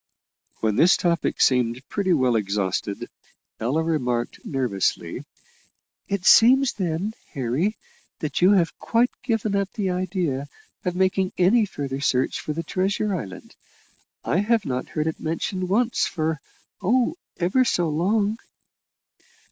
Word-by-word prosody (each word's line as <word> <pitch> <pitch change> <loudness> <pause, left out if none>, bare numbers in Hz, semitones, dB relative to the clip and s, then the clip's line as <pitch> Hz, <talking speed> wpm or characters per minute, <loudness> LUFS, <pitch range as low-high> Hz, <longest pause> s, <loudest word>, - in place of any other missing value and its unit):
When 110 -1 +1
this 175 +7 +6
topic 170 -1 0
seemed 125 0 +2
pretty 200 -3 -1
well 130 -7 +3
exhausted, 100 -1 -1 0.5
Ella 135 +8 0
remarked 125 -7 -1
nervously, 125 -9 -2 0.8
"It 195 -2 -2
seems 260 +3 +6
then, 185 +2 -2 0.2
Harry, 140 - -1 0.4
that 155 +2 -3
you 185 +3 +6
have 175 -4 +2
quite 235 +2 +2
given 225 -4 -1
up 200 -1 0
the 200 -5 -1
idea 180 -7 -2 0.4
of 180 -1 -2
making 190 0 +1
any 205 +5 +4
further 140 -6 -4
search 130 -2 +1
for - - -4
the 165 +2 -3
treasure 195 +4 -1
island. 95 - -7 0.7
I - - 0
have 215 0 +1
not 130 0 -3
heard 155 - -2
it 160 - -2
mentioned 180 +3 -3
once 235 +4 +2
for 160 -3 -2 0.4
oh! 240 - +2 0.2
ever 190 +9 +2
so 175 -8 +1
long." 200 +7 +1
175 Hz, 130 wpm, -24 LUFS, 135-200 Hz, 0.8 s, this